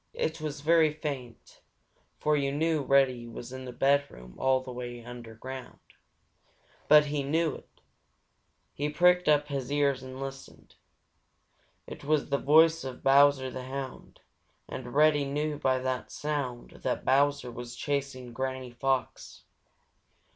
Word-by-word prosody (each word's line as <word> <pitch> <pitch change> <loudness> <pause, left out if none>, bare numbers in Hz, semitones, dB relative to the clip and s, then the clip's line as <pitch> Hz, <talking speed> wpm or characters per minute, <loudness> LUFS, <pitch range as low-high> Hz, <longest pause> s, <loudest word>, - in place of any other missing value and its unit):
It 475 - -2
was 150 -1 -4
very 160 0 +4
faint, 140 -6 -7 0.6
for 150 0 +1
you 140 -1 0
know 155 +1 +1
Reddy 130 -3 +2
was 120 +2 -9
in 130 0 -7
his 125 - -8
bedroom 135 - 0
way 125 -2 -2
underground, 120 +2 -9 1.1
but 150 0 +7
he 145 0 -2
knew 155 +3 0
it. - - -14 0.9
He 145 +1 -2
pricked 180 +2 +4
up 150 -1 +3
his 135 -2 -3
ears 140 -2 +1
and 130 0 -9
listened. 135 0 -9 1.1
It - - -10
was 150 +1 +1
the 140 0 +1
voice 160 +2 +5
of 130 -1 -7
Bowser 135 -1 +5
the 130 -1 -6
Hound, 135 0 -7 0.5
and 125 0 -7
Reddy 150 -1 +5
knew 150 +1 -2
by 130 -2 +2
the 130 0 -2
sound 140 -5 -4
that - - -2
Bowser 140 -2 +2
was 120 0 -8
chasing 135 -3 -3
Granny 130 0 -4
Fox. 130 +1 -2
135 Hz, 135 wpm, -29 LUFS, 130-150 Hz, 1.1 s, but